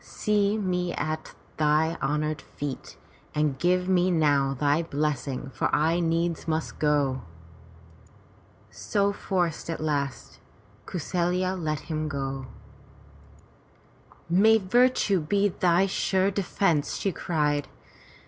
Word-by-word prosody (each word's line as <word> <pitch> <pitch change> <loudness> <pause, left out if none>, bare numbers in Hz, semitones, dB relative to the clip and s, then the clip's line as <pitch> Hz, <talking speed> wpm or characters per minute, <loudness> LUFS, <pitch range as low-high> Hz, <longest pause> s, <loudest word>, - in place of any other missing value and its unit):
See 210 -1 0
me 180 -3 -1
at 155 +1 -4 0.2
thy 155 +2 +2
honored 150 +2 -1
feet 145 -2 -7 0.4
and 150 -3 0
give 180 +2 +2
me 185 -1 +3
now 145 -5 +2
thy 145 +3 +2
blessing, 145 -4 -2
for 135 - 0
I 160 +3 +2
needs 170 0 0
must 160 0 -2
go." 145 -3 +1 1.5
So 200 -1 0
forced 175 -5 -2
at 165 - -3
last, 145 -4 -3 0.5
Kau - - -4
saFya 180 +3 0
let 155 -5 -2
him 155 -2 -3
go. 135 -2 -4 1.8
"May 205 +6 +5
virtue 220 -1 +3
be 200 +6 +1
thy 180 0 +2
sure 190 0 +1
defence!" 185 -5 0
she 195 - -1
cried. 150 -5 -1
165 Hz, 110 wpm, -26 LUFS, 150-185 Hz, 1.8 s, May